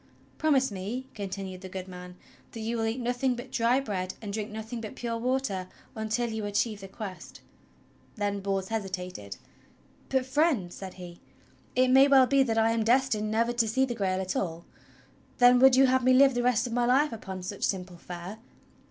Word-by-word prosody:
"Promise 275 -5 +2
me," 205 +7 -5
continued 195 -2 -6
the 190 - -8
good 185 0 -6
man, 180 -1 -10 0.4
"that 225 - -6
you 225 +2 -2
will 225 -1 -1
eat 225 +3 -2
nothing 245 +1 0
but 245 +2 -9
dry 250 0 +2
bread 190 -8 -3
and 205 -2 -6
drink 215 0 -3
nothing 220 +2 -6
but 215 - -7
pure 235 -1 -3
water 235 -6 -1 0.3
until 220 +2 -2
you 220 -1 -4
achieve 205 +1 -1
the 195 - -8
Quest." 195 -1 -9 0.7
Then 205 -2 -1
Bors 195 -1 -2
hesitated. 185 - -5 0.4
' - - -32
"But, 265 -1 +1
Friend," 260 - +1
said 190 -1 -8
he, 175 -2 -11 0.5
"it 255 0 +4
may 265 +2 +7
well 270 -2 +6
be 275 +1 +3
that 230 -4 +1
I 225 0 +4
am 230 -1 +1
destined 230 -3 +2
never 230 +2 +1
to 235 -2 +1
see 260 +5 +2
the 250 - -3
Grail 190 -4 -1
at 185 -1 -3
all. 170 -2 -3 0.7
Then 245 0 +6
would 265 0 +7
you 270 +1 +6
have 260 0 +2
me 255 +1 +5
live 270 +1 +6
the 245 - 0
rest 245 -1 +2
of 240 - -4
my 240 0 +1
life 270 +2 +3
upon 190 -4 -7
such 195 +2 -6
simple 180 -2 -2
fare?" 180 +5 -8
225 Hz, 200 wpm, -28 LUFS, 190-250 Hz, 0.7 s, may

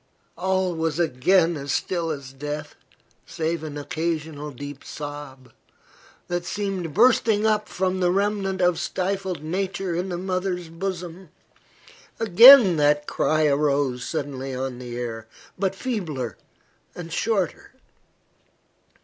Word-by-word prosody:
All 190 -1 0
was 160 -2 -2
again 165 +1 +2
still 165 +4 -1
as 140 -4 -6
death, 145 +2 -6 0.5
save 160 0 -2
an 150 -2 -6
occasional 155 0 -3
deep 145 +1 -9
sob, 145 -3 -8 0.7
that 175 0 -2
seemed 185 -3 -3
bursting 220 -2 +4
up 215 -1 +1
from 185 0 -1
the 180 -1 +2
remnant 195 -1 0
of 180 -1 +3
stifled 190 -3 -2
nature 185 +2 -2
in 180 +3 -2
the 175 - -3
mother's 185 -1 -2
bosom. 180 0 -6 0.9
Again 225 - +9
that 150 0 +3
cry 155 +1 +1
arose 140 -3 +1
suddenly 135 -2 -4
on 130 -1 -4
the 120 -1 -7
air, 115 -2 -5 0.3
but 195 0 -1
feebler 170 - -3 0.6
and 170 -2 -7
shorter. 200 -3 -1
170 Hz, 115 wpm, -24 LUFS, 145-190 Hz, 0.9 s, Again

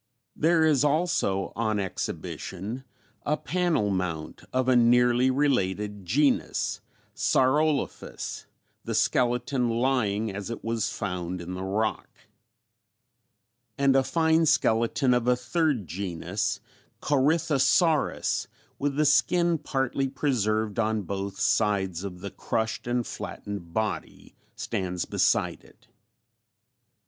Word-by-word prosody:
There 160 0 +3
is 150 -3 +3
also 150 - +1
on 110 -2 0
exhibition 100 +4 -5 0.4
a 150 +1 0
panel 160 - 0
mount 90 -5 -3
of 130 0 0
a 130 - +4
nearly 120 +1 +4
related 105 -7 0
genus, 140 +7 +1 0.3
Saurolophus 145 +2 0 0.4
the - - -3
skeleton 125 0 +1
lying 115 -4 0
as 100 +1 -5
it 115 - -6
was 115 -2 -1
found 90 -2 -4
in 85 +1 -6
the 90 +1 -5
rock, 105 +3 -1 1.7
and 140 -1 +3
a 135 - +6
fine 160 +2 +2
skeleton 115 +2 +2
of 125 -1 +1
a 125 - +5
third 125 - 0
genus 90 +4 -3 0.4
Corythosaurus 155 +2 +2 0.3
with 140 -1 -1
the 155 +1 +2
skin 170 +3 +3
partly 135 -2 -1
preserved 110 -6 0
on 110 -1 0
both 100 +1 -4
sides 95 -4 +1
of 90 -3 -7
the 100 - -6
crushed 110 +1 -3
and 120 -1 0
flattened 100 -5 -7
body 110 +3 -4 0.2
stands 90 -2 -3
beside - - +1
it. - - -22
120 Hz, 110 wpm, -27 LUFS, 100-140 Hz, 1.7 s, a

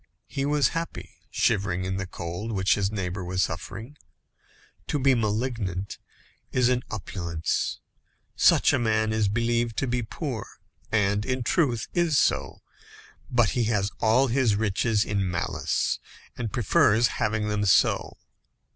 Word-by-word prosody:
He 140 0 -2
was 145 -1 +3
happy, 165 0 -5 0.2
shivering 95 -4 0
in 95 0 -2
the 95 -1 -3
cold 90 +6 -5
which 95 0 +2
his 100 -1 0
neighbour 95 -2 -3
was 90 +1 0
suffering. 100 - -6 0.9
To - - 0
be 135 -1 +4
malignant 110 -4 -2 0.5
is 125 -1 +3
an 125 -1 +1
opulence. 85 -5 -3 0.6
Such - - +5
a - - +2
man 110 -1 +1
is 110 -2 +2
believed 115 +1 0
to - - +1
be 125 -1 -1
poor, 115 0 -5 0.4
and, 105 -1 +2
in 125 +1 -2
truth, 125 -4 +1
is 170 -4 +2
so; - - 0 0.7
but 120 -4 +3
he 120 -2 0
has 105 -2 0
all 115 +5 +4
his 125 -4 +2
riches 105 +1 +1
in 100 -3 -1
malice, 90 0 -1 0.4
and 115 -4 -4
prefers 120 -2 +3
having 105 0 0
them 105 0 0
so. 100 - +2
110 Hz, 140 wpm, -26 LUFS, 100-125 Hz, 0.9 s, Such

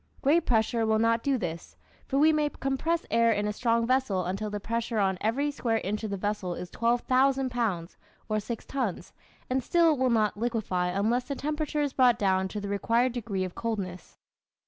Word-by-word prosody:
Great 310 +4 +3
pressure 225 0 +2
will 220 0 +2
not 230 +1 +2
do 275 0 +1
this, 170 -6 -5 0.3
for 275 - -1
we 310 +2 +5
may 300 -1 +1
compress 290 +5 -1
air 230 0 +4
in 210 -1 0
a 210 - -1
strong 230 +1 +1
vessel 240 -8 +1
until 195 +4 -3
the 205 0 -4
pressure 230 +2 -2
on 195 -2 +2
every 275 +7 0
square 235 -5 -1
inch 210 +3 -3
of 215 - -2
the 200 - -3
vessel 195 -3 -2
is 175 0 -7
12,000 255 +3 +2
pounds, 200 -8 -2 0.3
or 215 0 0
six 230 +2 -6
tons, 250 -9 -3 0.3
and 255 0 0
still 335 +1 +4
it 285 - -4
will 260 -1 +3
not 220 -3 +2
liquefy 215 -5 -1
unless 215 +7 0
the 280 - -4
temperature 300 +1 -2
is 285 -2 -1
brought 250 -3 +4
down 190 -3 +1
to 210 +3 -5
the 200 - -5
required 230 +5 +1
degree 210 -6 -3
of 185 -1 -5
coldness. 195 -6 -5
230 Hz, 200 wpm, -28 LUFS, 205-260 Hz, 0.3 s, we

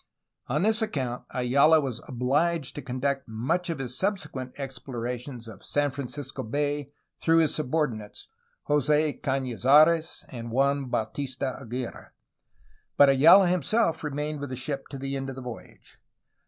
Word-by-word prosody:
On 150 +7 0
this 220 +2 +3
account 130 - -2
Ayala 140 +6 +4
was 130 -5 -3
obliged 140 +5 0
to 145 - -6
conduct 135 +1 -2
much 150 - -1
of 165 - -2
his 125 -2 -5
subsequent 140 -9 -3
ex 135 -3 -6
plorations 125 0 -5
of 105 -3 -11
San 145 -1 0
Francisco 140 0 -6
Bay 145 +3 -2 0.3
through 165 0 +3
his 160 -2 +3
subordinates, 130 -8 -2 0.4
Jose 150 +1 +2
Canizares 135 +5 +3
and 115 -2 -7
Juan 140 +3 +1
Bautista 130 +3 -2
Aguirre, 120 +1 -6 0.9
but 145 -1 +8
Ayala 165 +8 +7
him 180 0 +1
self 165 - +1
remained 150 0 -3
with 145 -1 -5
the 130 - -4
ship 135 +2 -4
to 140 - -7
the 135 +1 -4
end 135 0 -3
of 135 - -6
the 130 - -7
voyage. 120 -2 -11
135 Hz, 150 wpm, -27 LUFS, 125-150 Hz, 0.9 s, but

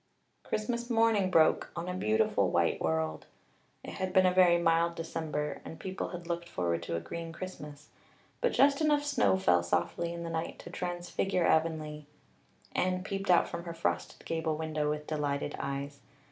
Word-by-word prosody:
Christmas 235 +2 -2
morning 225 -4 +3
broke 160 -3 +4
on 170 +1 -4
a 180 - -2
beautiful 110 -12 +2
white - - +1
world. 80 -1 -1 0.6
It - - -7
had 185 -1 -3
been 185 0 +6
a 180 - +4
very 180 -2 +6
mild 170 0 +2
December 155 -2 -3
and 160 - -9
people 190 +3 -4
had 175 -2 -7
looked 170 0 -3
forward 85 - -1
to 85 - -3
a - - 0
green 165 - -6
Christmas; 150 -5 -8 0.5
but 485 - +2
just 280 +2 +4
enough 295 -2 +3
snow 290 -9 +2
fell 90 - +3
softly 90 - -1
in 170 0 -5
the 165 - -4
night 165 0 -3
to 170 - -10
transfigure 175 0 -1
Avonlea. 155 -2 0 0.7
Anne 185 0 +1
peeped 195 0 -4
out 175 - +5
from 170 +1 -6
her 170 -1 -6
frosted 165 - -2
gable 160 -1 -1
window 155 -1 -1
with 150 0 -2
delighted 145 -2 -2
eyes. 140 +1 -4
170 Hz, 175 wpm, -31 LUFS, 150-185 Hz, 0.7 s, been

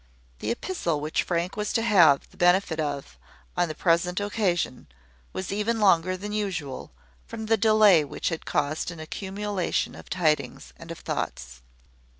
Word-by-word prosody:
The - - -3
epistle 235 - -2
which 150 +2 0
Frank 175 +1 -2
was 210 0 -2
to 225 - +1
have 175 -11 +5
the - - -20
benefit 180 -2 +3
of, 145 -2 -4 0.4
on 175 0 +2
the 155 - -5
present 175 +2 +1
occasion, 200 - -1 0.4
was 190 - -5
even 215 +3 0
longer 185 -2 +3
than 205 +3 -6
usual, 180 -10 -3 0.4
from 220 - -6
the 225 +1 +3
delay 215 -6 +5
which 145 - -3
had 165 -2 -4
caused 145 +3 -1
an 170 -2 -8
accumulation 195 +3 -2
of - - -12
tidings 160 -4 -1
and - - -12
of - - -6
thoughts. 60 0 -5
180 Hz, 155 wpm, -26 LUFS, 160-205 Hz, 0.4 s, have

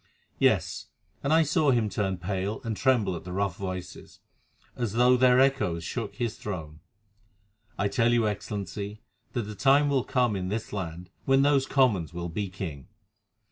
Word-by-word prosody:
Yes, - - +1 0.3
and 140 - -1
I 160 +1 +6
saw 155 0 +2
him 120 -4 +3
turn 95 -2 -1
pale 95 +3 -3
and 115 -2 -2
tremble 120 -7 +2
at 85 - -7
the 90 - -8
rough 95 -1 -1
voices, 95 -3 -7 0.6
as 115 -5 -2
though 125 +2 +5
their 125 0 +5
echoes 105 -12 +2
shook 110 +3 -4
his 120 -3 -3
throne. 80 -7 -6 1.0
I 100 - +1
tell 115 +3 +2
you, 120 -2 +3
Excellency, 105 0 -5 0.3
that 120 - -1
the 105 +1 -7
time 140 +5 +4
will 135 -3 +2
come 125 -5 +1
in 90 -1 -3
this 110 +3 -4
land 90 -2 -5
when 135 0 +4
those 140 -2 +3
Commons 105 - +2
will 85 0 -4
be 100 +4 -3
king. 85 -8 -6
105 Hz, 170 wpm, -27 LUFS, 95-125 Hz, 1.0 s, I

